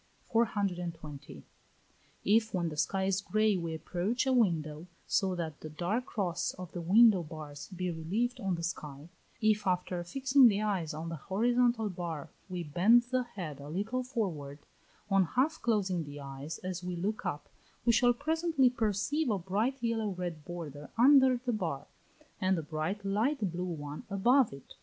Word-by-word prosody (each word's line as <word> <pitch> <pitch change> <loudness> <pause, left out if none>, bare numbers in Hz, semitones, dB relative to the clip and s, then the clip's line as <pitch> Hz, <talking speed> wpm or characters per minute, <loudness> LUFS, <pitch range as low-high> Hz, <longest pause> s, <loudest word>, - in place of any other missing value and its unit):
420. 175 - -2 0.8
If, 220 0 +3
when 170 -2 0
the 155 - -7
sky 190 +5 0
is 190 0 +1
grey, 215 +1 +2
we 170 -3 -3
approach 185 +10 -1
a 265 - +2
window, 165 -8 +1 0.2
so 190 -2 +1
that 160 -3 -4
the 155 - -6
dark 180 +11 -2
cross 180 -6 -2
of 180 -2 -8
the 175 - -5
window 205 +2 +6
bars 150 -3 -8
be 180 -1 -3
relieved 210 +11 -2
on 195 -5 -1
the 170 - -6
sky; 150 -2 -5 0.3
if 215 -2 +2
after 180 -1 0
fixing 265 +7 +5
the 205 -3 +2
eyes 190 -8 -1
on 160 +2 -5
the 165 - -4
horizontal 235 - +2
bar 170 -6 -5 0.2
we 180 -1 -3
bend 190 +11 +5
the 255 0 +2
head 180 - -7
a 140 +1 -9
little 210 +10 -1
forward; 175 - -3 0.5
on 195 -1 +5
half 260 - 0
closing 195 -7 +1
the 145 -1 -9
eyes 140 +2 -6
as 185 -1 -4
we 180 0 -3
look 200 +5 -2
up, 150 -6 -3 0.4
we 235 - +5
shall 245 +2 +5
presently 315 0 +2
perceive 240 +6 0
a 210 - +2
bright 205 +9 -1
yellow 225 -2 0
red 175 -4 -5
border 150 -4 -7
under 260 +1 +6
the 245 0 -2
bar, 165 -10 -3 0.5
and 190 -2 +2
a 165 - -3
bright 160 +7 -3
light 210 - +1
blue 175 +2 -3
one 150 -4 -5
above 240 +6 +4
it. 140 0 -12
185 Hz, 170 wpm, -31 LUFS, 165-230 Hz, 0.8 s, window